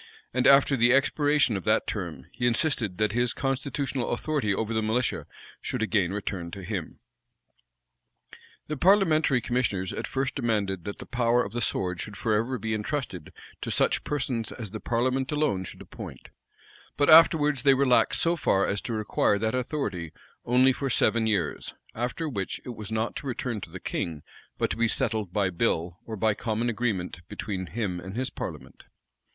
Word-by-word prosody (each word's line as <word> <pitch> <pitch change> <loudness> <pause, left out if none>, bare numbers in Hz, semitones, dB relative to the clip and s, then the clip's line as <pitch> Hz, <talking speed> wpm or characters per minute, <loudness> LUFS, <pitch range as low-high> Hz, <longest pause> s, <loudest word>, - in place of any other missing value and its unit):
And 125 0 +3
after 140 0 +6
the 120 -1 +4
expiration 145 -2 +3
of 95 - -3
that - - +3
term, 75 -7 -5
he 120 +1 -1
insisted 115 - 0
that 105 0 +1
his 120 +1 +1
constitutional 135 -1 -2
authority 135 -4 -1
over 110 +3 -1
the 110 - +1
militia 115 +3 0 0.3
should - - -2
again 105 -5 +1
return 95 -4 -4
to 95 +2 -8
him.[*] 90 -3 -4 1.7
The 150 - -4
parliamentary 160 -7 +4
commissioners 115 -8 -1
at - - -4
first 135 0 -1
demanded, 105 - -1
that 100 - -5
the - - -9
power 120 0 +2
of 100 - -8
the 120 - -1
sword 90 -4 0
should 105 0 -6
forever 115 +3 0
be 110 -2 -3
intrusted 105 - -3 0.3
to - - -4
such - - +1
persons 130 -6 -2
as 110 -5 -7
the 110 - -5
parliament 130 +4 0
alone 145 -11 0
should - - -8
appoint:[] - - -10 0.7
but 145 - +3
afterwards 155 -4 +6
they 135 0 +5
relaxed 130 -2 +3
so 170 +1 +3
far 100 - +2
as 100 - -1
to 120 - -4
require 105 -1 +1
that 110 +2 -1
authority 120 - -2 0.3
only 130 +2 +4
for 135 +1 -3
seven 115 -2 +2
years; 100 -7 -1 0.2
after 125 +8 -2
which 100 -10 -3
it - - -6
was 110 -3 -7
not 110 +1 -1
to 140 - -6
return 120 -3 -3
to 90 - -8
the 95 +3 -8
king 80 -4 -3 0.3
but - - 0
to - - -2
be 115 0 +3
settled 110 -4 -1
by 95 -1 +1
bill, 85 -2 -1
or 110 - -4
by 110 +1 +2
common 110 +3 -1
agreement 105 -7 -2
between 95 -4 -4
him 100 -5 -3
and 95 +3 -8
his 130 +2 -2
parliament. - - -8
115 Hz, 175 wpm, -27 LUFS, 100-130 Hz, 1.7 s, after